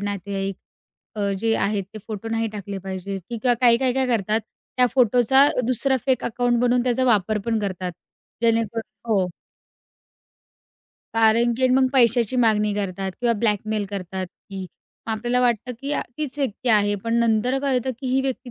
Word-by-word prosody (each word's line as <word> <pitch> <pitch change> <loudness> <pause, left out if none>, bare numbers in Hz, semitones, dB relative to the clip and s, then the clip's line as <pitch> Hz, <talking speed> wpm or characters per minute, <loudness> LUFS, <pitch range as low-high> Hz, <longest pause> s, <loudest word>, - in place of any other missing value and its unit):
नातेवाईक 195 -1 -3 0.6
अ, 200 -1 0
जे 225 +1 +1
आहेत, 200 -1 0
ते 215 - -6
फोटो 220 +1 -5
नाही 225 0 -1
टाकले 200 -2 -6
पाहिजे, 190 +1 -5
की 235 +7 -7
किंवा 245 +1 +2
काही-काही 245 +1 +4
काय 265 -1 +2
करतात, 220 -2 +1 0.4
त्या 250 - +5
फोटोचा 250 +2 +5 0.2
दुसरा 265 +2 +1
फेक 260 -2 +2
अकाउंट 240 +1 0
बनवून 245 0 +2
त्याचा 255 +1 +1
वापर 215 -3 +2
पण 230 -1 0
करतात. 185 -3 -3 0.5
जेणेकरून 230 -1 +1 0.3
हो. 190 -4 +2 1.9
कारण 225 +1 +4
की 260 - -4
अन् 255 0 +4
मग 265 0 +4
पैशाची 240 -2 +3
मागणी 215 -3 +3
करतात 195 -1 -3
किंवा 240 -1 +2
ब्लॅकमेल 215 0 0
करतात, 190 -1 -4
की 190 +1 -9 0.4
आपल्याला 240 +3 0
वाटतं 245 0 0
की 280 +1 -3
आ - - 0 0.2
तीच 295 -1 -4
व्यक्ती 255 -2 -2
आहे, 205 -2 +3
पण 230 - 0
नंतर 235 +3 +2
कळतं 265 -2 0
की 265 - -5
ही 260 +1 +2
व्यक्ती 260 -1 -4
225 Hz, 160 wpm, -23 LUFS, 205-250 Hz, 1.9 s, त्या